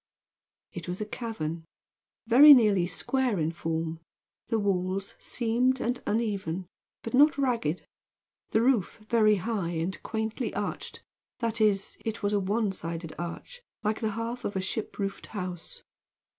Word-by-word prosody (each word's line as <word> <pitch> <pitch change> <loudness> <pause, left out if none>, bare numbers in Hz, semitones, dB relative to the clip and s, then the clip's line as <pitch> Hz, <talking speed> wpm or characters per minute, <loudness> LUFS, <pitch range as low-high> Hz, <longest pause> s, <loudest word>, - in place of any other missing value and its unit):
It 175 -3 -7
was 180 +1 -4
a 210 - -2
cavern, 190 -8 -4 0.6
very 280 +6 +10
nearly 205 -7 +4
square 245 +6 0
in 160 -1 0
form; 165 -1 -3 0.5
the 225 0 +1
walls 195 -1 -1
seamed 250 +2 +1
and 245 +1 -1
uneven, 200 -6 -1 0.4
but 230 - -5
not 290 +4 +6
ragged; 235 - 0 0.6
the 220 - +2
roof 240 -6 +2
very 215 -2 +4
high 195 -2 -2
and 165 +3 -2
quaintly 220 +3 -3
arched, - - -4 0.3
that 230 -2 -1
is, 200 -2 +2
it 220 -1 -4
was 205 +1 +1
a 205 - +3
one 205 +2 0
sided 165 -3 -5
arch, 175 - -6 0.2
like 215 +2 0
the 220 -2 0
half 235 +2 -3
of 205 - -3
a - - +1
ship 190 +3 -3
roofed 195 -1 -4
house. 180 -5 -6
210 Hz, 145 wpm, -28 LUFS, 180-230 Hz, 0.6 s, very